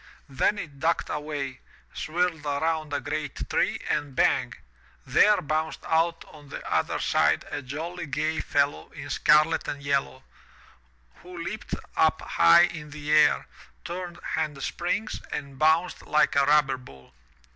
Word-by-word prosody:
Then 135 +10 +1
it 145 -8 -7
ducked 165 +3 0
away, 145 -3 -4 0.3
swirled 165 -1 -1
around 155 +1 -1
a 145 - 0
great 150 -1 -4
tree - - +1
and 145 -3 -2
bang! - - +2 0.5
there 210 0 +4
bounced 155 +2 -2
out 165 +1 +1
on 145 -2 -15
the - - -7
other - - 0
side - - +2
a - - -3
jolly 160 +6 -6
gay 155 +3 -1
fellow 140 - 0
in - - -8
scarlet 155 +2 +3
and 140 -1 -5
yellow, 140 -2 -1 0.9
who 180 0 -12
leaped 170 - -5 0.2
up - - +3
high 85 - +6
in 155 -3 -3
the 150 0 -5
air, 150 -1 +4 0.4
turned 175 0 -5 0.2
hand 150 -3 -2
springs, 205 +5 -2
and 140 -2 -6
bounced 160 +3 +2
like 150 - +3
a 140 -1 +4
rubber 145 -3 +4
ball. 65 - -16
150 Hz, 145 wpm, -26 LUFS, 140-165 Hz, 0.9 s, high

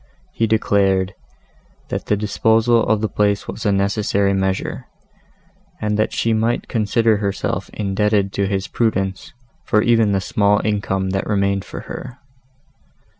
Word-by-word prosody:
He 115 - 0
declared, 100 -3 +2 0.8
that - - -4
the 105 - +2
disposal 110 +3 +2
of 110 0 +2
the 110 - +1
place 100 -1 0
was 115 - -4
a - - +3
necessary 100 0 +1
measure; 95 0 -2 0.9
and 105 0 -1
that 110 +1 +1
she 115 - 0
might 115 +2 0
consider 115 0 +2
herself 100 -2 -2
indebted 100 -1 0
to 100 -1 0
his 95 -1 -1
prudence 95 -5 -1 0.3
for 105 0 +2
even 115 -3 +3
the 100 - +2
small 100 +1 +2
income 95 -3 -1
that 95 0 -2
remained 100 -2 +1
for - - -7
her. 130 0 -8
105 Hz, 140 wpm, -20 LUFS, 100-110 Hz, 0.9 s, a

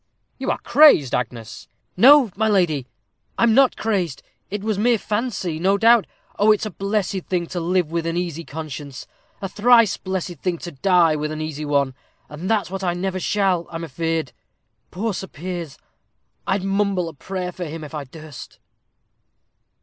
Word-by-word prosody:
"You - - -2
are - - +1
crazed, 285 - +5
Agnes." 115 -2 -4 0.3
"No, 260 +2 +7
my 220 +2 +1
lady, 165 -10 +1 0.5
I'm 235 -1 +4
not 265 +2 +5
crazed; 185 -10 -1 0.3
it 205 0 -4
was 215 -2 -1
mere 235 +2 +3
fancy, 210 -7 -3
no 195 +3 +2
doubt. 230 +1 +5 0.3
Oh, 210 +1 +5
it's 215 - +1
a 215 - -4
blessed 195 -1 -2
thing 180 -2 -1
to 180 - -3
live 175 -1 0
with 165 0 -2
an 165 +1 -1
easy 170 -2 -3
conscience 145 -3 -7 0.4
a - - -1
thrice 225 +2 +4
blessed 185 -3 -4
thing 180 +1 -1
to 175 - -8
die 170 +1 +3
with 150 0 -3
an 155 - -5
easy 155 -1 -4
one, 140 -2 +1 0.4
and 155 +5 -6
that's 215 -5 0
what 195 0 -4
I 175 -1 0
never 185 +1 -2
shall, 190 -3 0
I'm 165 0 -6
afeard. 160 0 -2 0.6
Poor 215 +4 -2
Sir 190 +1 -5
Piers! 170 -3 -6 0.7
I'd 190 0 0
mumble 195 -2 0
a 165 - -7
prayer 180 +4 -5
for 180 0 -6
him, 160 0 -7
if 150 - -10
I 150 -2 -5
durst." 155 +1 -11
180 Hz, 170 wpm, -22 LUFS, 160-200 Hz, 0.7 s, No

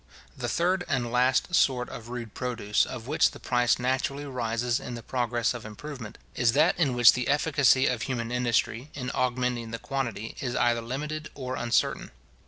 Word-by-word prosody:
—The 120 - -3
third 180 +6 +1
and 120 -4 0
last 130 +7 +2
sort 130 -6 +3
of 115 0 -9
rude 120 -3 -6
produce, 115 -5 0
of 115 - -7
which 150 +4 +3
the - - -12
price 120 -1 +2
naturally 130 +3 -1
rises 120 -2 -1
in 125 - -6
the 115 - -8
progress 120 -2 0
of 120 - -7
improvement, 115 +1 -8 0.2
is 120 -2 +2
that 155 +5 +4
in 140 -7 +2
which 120 -2 +8
the 125 -1 -2
efficacy 145 -3 +3
of 125 -3 0
human 120 -1 -3
industry, 125 +1 0
in 125 -3 -4
augmenting 125 -2 -1
the 115 - -4
quantity, 120 -3 -4
is 125 -2 -3
either 120 -1 +2
limited 150 +6 -4
or 130 -1 -4
uncertain. 120 -3 0
125 Hz, 180 wpm, -27 LUFS, 120-135 Hz, 0.2 s, which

